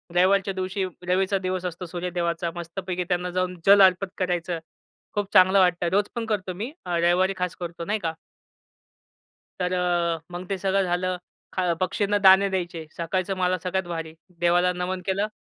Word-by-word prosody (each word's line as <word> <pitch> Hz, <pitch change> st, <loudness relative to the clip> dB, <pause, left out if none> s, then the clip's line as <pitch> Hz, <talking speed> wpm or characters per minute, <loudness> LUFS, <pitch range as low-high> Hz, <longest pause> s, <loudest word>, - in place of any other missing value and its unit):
रविवारच्या 195 Hz, +2 st, +3 dB
दिवशी 190 Hz, +1 st, -2 dB, 0.2 s
रवीचा 190 Hz, +2 st, +2 dB
दिवस 185 Hz, 0 st, -2 dB
असतो 180 Hz, +1 st, -4 dB
सूर्यदेवाचा. 170 Hz, -1 st, -2 dB
मस्तपैकी 180 Hz, +1 st, -4 dB
त्यांना 180 Hz, 0 st, 0 dB
जाऊन 185 Hz, 0 st, -1 dB
जल 200 Hz, 0 st, +8 dB
अर्पण 190 Hz, +1 st, +5 dB
करायचं. 175 Hz, -2 st, -1 dB, 0.5 s
खूप 205 Hz, -1 st, -2 dB
चांगलं 185 Hz, +1 st, +6 dB
वाटतं. 180 Hz, -1 st, +3 dB
रोज 205 Hz, +1 st, +3 dB
पण 235 Hz, -, -2 dB
करतो 195 Hz, -4 st, -2 dB
मी 220 Hz, +9 st, -5 dB
अ, 175 Hz, -1 st, -1 dB
रविवारी 175 Hz, +3 st, +3 dB
खास 180 Hz, -1 st, -2 dB
करतो 170 Hz, -1 st, -6 dB
नाही 210 Hz, +1 st, -1 dB
का. 165 Hz, -3 st, -2 dB, 1.5 s
तर 180 Hz, 0 st, 0 dB
अ, 175 Hz, -2 st, +1 dB
मग 175 Hz, +1 st, -6 dB
ते 195 Hz, -, -1 dB
सगळं 195 Hz, +1 st, +1 dB
झालं. 180 Hz, 0 st, -1 dB, 0.4 s
अ, 180 Hz, -2 st, +2 dB
पक्षींना 205 Hz, +3 st, +1 dB
दाणे 195 Hz, 0 st, +6 dB
द्यायचे. 175 Hz, -4 st, -3 dB
सकाळचं 185 Hz, +3 st, -1 dB
मला 185 Hz, 0 st, +1 dB
सगळ्यात 190 Hz, +1 st, -1 dB
भारी. 165 Hz, -2 st, -5 dB, 0.3 s
देवाला 175 Hz, +1 st, +3 dB
नमन 180 Hz, +1 st, -3 dB
केलं. 200 Hz, +2 st, 0 dB
180 Hz, 165 wpm, -25 LUFS, 175-190 Hz, 1.5 s, जल